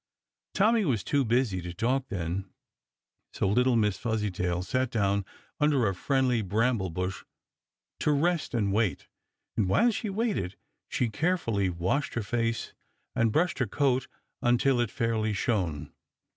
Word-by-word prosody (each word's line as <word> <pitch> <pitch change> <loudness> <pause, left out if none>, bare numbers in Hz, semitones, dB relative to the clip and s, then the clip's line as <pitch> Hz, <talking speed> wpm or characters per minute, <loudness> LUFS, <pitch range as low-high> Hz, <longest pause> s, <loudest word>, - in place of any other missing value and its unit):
Tommy 220 +2 +4
was 120 - 0
too 140 +8 +1
busy 115 -5 +1
to 90 0 -7
talk 130 +6 0
then, 95 -2 -3 0.8
so - - 0
little 125 +5 +3
Miss 105 -3 +1
Fuzzytail 95 -6 -1
sat 130 +7 0
down 100 -3 +1 0.4
under 145 -5 +3
a 100 - 0
friendly 130 +3 +1
bramble 110 0 +1
bush 90 +3 -3 0.8
to 150 - +2
rest 160 -1 +1
and 100 -4 +1
wait, 105 -3 0 0.5
and 100 -4 +1
while 235 - +4
she 220 0 -3
waited, 195 - -1 0.3
she 125 - 0
carefully 115 - 0
washed 90 +12 -1
her 120 - -1
face 115 +2 -1 0.4
and 115 -1 +2
brushed 165 +6 +1
her 125 - +1
coat 130 -2 +1 0.3
until 120 +2 +3
it 120 -2 +1
fairly 110 -1 0
shone. 85 -9 -1
115 Hz, 145 wpm, -28 LUFS, 100-135 Hz, 0.8 s, Tommy